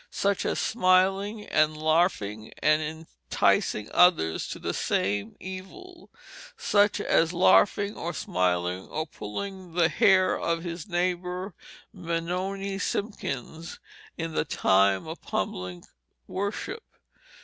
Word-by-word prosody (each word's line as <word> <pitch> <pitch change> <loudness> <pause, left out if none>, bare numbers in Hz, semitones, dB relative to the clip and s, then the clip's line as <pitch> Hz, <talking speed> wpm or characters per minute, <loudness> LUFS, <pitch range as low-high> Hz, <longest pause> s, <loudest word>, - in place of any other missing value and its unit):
Such 200 -1 0
as - - -1
Smiling 195 +1 +2
and 155 0 +2
Larfing 155 - 0
and 155 0 +4 0.5
Intiseing 105 0 +2
others 170 - +4
to - - -6
the - - -3
Same 100 +2 -1
Evil. 340 - -10 0.5
Such 205 0 +2
as 165 +1 +2
Larfing 200 +3 +4
or 170 - -4
Smiling 90 - -1
or 155 +1 -3
puling 185 - -7
the 170 -1 +3
hair 190 -4 +4
of 165 0 -1
his 170 -2 -5
nayber 180 +1 -2 0.4
Benoni 185 +3 -3
Simkins 165 - -4 0.4
in 165 -1 -4
the - - +1
time 95 -8 +2
of 160 +1 -7
Publick 90 -2 -4 0.4
Worship. 205 - -4
175 Hz, 110 wpm, -27 LUFS, 155-195 Hz, 0.5 s, and